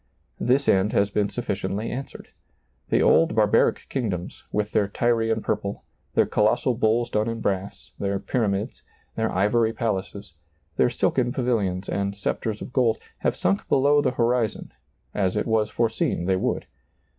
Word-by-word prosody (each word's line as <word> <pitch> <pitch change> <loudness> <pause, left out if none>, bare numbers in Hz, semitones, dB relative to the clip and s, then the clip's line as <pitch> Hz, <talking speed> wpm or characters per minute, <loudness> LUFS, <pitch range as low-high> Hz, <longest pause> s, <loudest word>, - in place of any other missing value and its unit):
This 135 +3 +2
end 95 +2 +3
has 100 0 +2
been 105 0 +1
sufficiently 105 -2 -3
answered. 135 +2 -7 0.6
The - - +3
old 80 +6 +4
barbaric 105 -2 +3
kingdoms, 100 -10 -4
with 105 0 -1
their 105 -2 +2
Tyrian 115 +1 0
purple, 100 0 -2 0.3
their - - +5
colossal 120 +4 +2
bulls 115 0 +1
done 105 +2 +1
in 115 0 -4
brass, 100 -2 -3
their 100 0 -1
pyramids, 100 -2 -2 0.3
their 110 0 0
ivory 110 +4 +2
palaces, 100 -4 -3 0.4
their - - +3
silken 125 -2 0
pavilions 105 -8 -1
and 100 0 -2
scepters 105 +1 -3
of 125 - -10
gold, 115 -4 +2 0.2
have - - 0
sunk 95 +3 0
below 145 +2 +4
the 140 - +2
horizon, 120 -2 0 0.4
as 95 -3 0
it - - 0
was 110 -1 +1
foreseen 110 -6 0
they 95 +1 +2
would. 95 - -1
110 Hz, 150 wpm, -24 LUFS, 100-120 Hz, 0.6 s, their